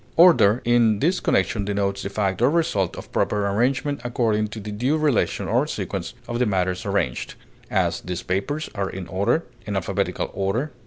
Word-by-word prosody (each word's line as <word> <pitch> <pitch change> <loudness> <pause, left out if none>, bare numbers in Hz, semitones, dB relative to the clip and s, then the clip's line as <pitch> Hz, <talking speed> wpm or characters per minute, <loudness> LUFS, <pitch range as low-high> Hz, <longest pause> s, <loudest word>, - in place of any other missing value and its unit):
Order 155 - +6
in 120 -3 +4
this 170 - +1
connection 100 +2 +1
denotes 100 -1 -1
the - - -4
fact 100 0 -1
or 125 - +5
result 145 - +1
of - - -9
proper 105 -1 0
arrangement 125 +6 0
according 115 -3 +1
to 105 +1 -8
the 105 0 -6
due 125 +9 0
relation 150 -6 +1
or - - +2
sequence - - -4
of 120 0 -3
the 125 - +2
matters 95 0 -1
arranged; 95 -11 -1 0.3
as, - - 0
these 90 0 -5
papers 145 +12 -2
are 100 -1 -2
in 95 -1 -6
order; 100 - +1 0.2
in 105 - -2
alphabetical 95 -3 -1
order. 100 +10 -1
105 Hz, 175 wpm, -23 LUFS, 100-125 Hz, 0.3 s, Order